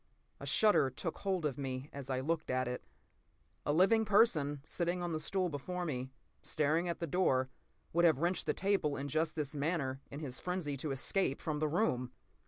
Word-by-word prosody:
A - - -6
shudder 210 -11 +4
took 130 +6 -5
hold 190 -5 -1
of 145 -2 -1
me 130 0 -3
as 140 -1 -7
I 130 -1 0
looked 160 +3 -1
at 130 0 +1
it. 125 0 -4 0.8
A - - +3
living 195 +8 +5
person, 160 -10 +3
sitting 175 +1 -1
on 175 - -2
the 155 - -1
stool 185 +3 0
before 175 +4 -4
me, 130 -4 -3 0.3
staring 155 +4 +1
at 170 - -3
the 170 - -1
door, 135 -6 +2 0.4
would 170 +1 +3
have 160 -5 +6
wrenched 175 +5 0
the - - +3
table 190 -7 +1
in 140 +1 -4
just 155 +2 0
this 150 -2 -2
manner 140 -3 -1
in 140 - -7
his 135 -5 -4
frenzy 180 -6 -2
to 150 +3 -3
escape 135 +3 0
from 150 -2 -2
the 155 - +1
room! 125 - 0
155 Hz, 195 wpm, -34 LUFS, 135-180 Hz, 0.8 s, have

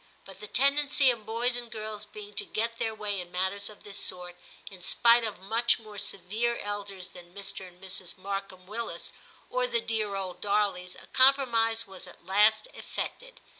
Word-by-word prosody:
But 195 - -11
the 210 - -7
tendency 280 +1 +4
of 225 -3 -6
boys 235 +2 +1
and 240 -1 -3
girls 215 -1 -5
being 420 0 -10
to - - +1
get 230 - -2
their 225 -2 -1
way 205 -3 -2
in 175 0 -10
matters 190 +3 0
of 210 - -14
this 205 -1 -4
sort, 180 -1 -4 0.4
in 190 -2 -11
spite 235 +5 +6
of 215 -4 -3
much 225 +5 +3
more 215 -3 -8
severe 210 +5 0
elders 200 -2 -4
than 175 +1 -13
Mr. 195 -1 -4
and 180 0 -17
Mrs. 190 0 -4
Markham 195 -1 -5
Willis, 210 -4 -4 0.3
or - - +1
the 480 -1 +1
dear 215 - -1
old 190 -2 -4
Darleys, 200 -3 +1
a - - -13
compromise 240 -4 +4
was 190 -2 -7
at - - -15
last 210 - +4
effected. - - -6
210 Hz, 180 wpm, -29 LUFS, 190-235 Hz, 0.4 s, spite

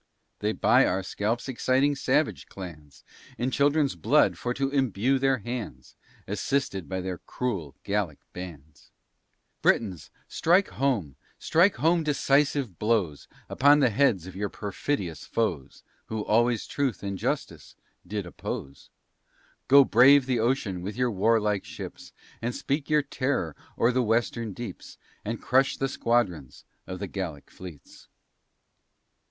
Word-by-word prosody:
They 105 - 0
buy - - +4
our 95 +1 -1
scalps 110 +6 -2
exciting 130 +2 +2
savage 140 +2 0
clans, 75 -7 -10 0.3
In 125 +2 -1
children's 145 +1 +2
blood 85 - +3
for 120 - -3
to 135 +2 -1
imbue 130 -1 +1
their 135 0 +2
hands, 105 - -7 0.3
Assisted 105 -3 -2
by 95 -1 -2
their 90 -1 -4
cruel 95 - -4
Gallic 100 -7 -1 0.2
bands. 80 -5 -10 0.7
Britains, 95 -7 +1 0.2
strike 180 +4 +2
home, 110 - -1 0.2
strike 180 +5 +3
home 165 +1 +2
decisive 140 - +1
blows 105 -10 0 0.2
Upon 145 +3 +5
the 130 -5 +3
heads 105 - +2
of 95 - -10
your 100 +1 -2
perfidious 100 - -3
foes, 85 - -2 0.2
Who 110 -1 -4
always 120 +1 +2
truth 135 -8 -2
and 100 0 -3
justice - - -4 0.3
did 100 0 -3
oppose. 70 -5 -7 0.8
Go 140 0 +8
brave 130 +4 +6
the 125 -2 0
ocean 110 -6 0
with 100 +4 -5
your 125 -1 +1
war 110 +3 +3
like 105 -2 -1
ships, - - -9 0.3
And 120 +1 -2
speak 140 +2 -2
your 150 -1 +3
terror 130 - -2 0.2
o'er 115 - +3
the 130 +1 +1
western 115 -1 0
deeps, 110 -3 -8 0.3
And 115 +2 -4
crush 135 +2 +2
the 135 - 0
squadrons 115 - -1 0.2
of 95 - -5
the - - -4
Gallic 85 -8 -6
fleets. 90 -6 -12
115 Hz, 135 wpm, -27 LUFS, 95-135 Hz, 0.8 s, Go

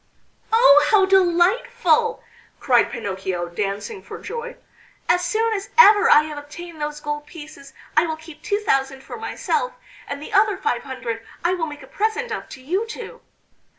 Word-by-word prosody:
"Oh! 295 - +7
how 400 -3 +5
delightful!" 375 +1 +2 0.4
cried 245 -3 +3
Pinocchio, 190 -5 -4
dancing 205 - -4
for - - -9
joy, 475 +1 -7 0.5
"As 360 0 +3
soon 440 +6 0
as 400 -2 -4
ever 420 -3 +7
I 300 - +7
have 305 -1 -6
obtained 315 +2 -10
those 295 0 -3
gold 295 0 -5
pieces, 300 -4 -12 0.2
I 315 +3 +4
will 315 -1 -3
keep 320 -1 -13
two 410 +1 -1
thousand 270 -7 0
for - - -8
myself, - - -2 0.3
and 280 - -5
the 300 - -9
other 405 0 +3
five 240 -10 -1
hundred 240 -4 -5 0.2
I 345 +1 +2
will 340 -3 -2
make 295 -2 -9
a - - -13
present 440 - -2
of - - -5
to 260 - -11
you 375 +11 -1
two." 460 +1 -9
325 Hz, 170 wpm, -22 LUFS, 280-410 Hz, 0.5 s, Oh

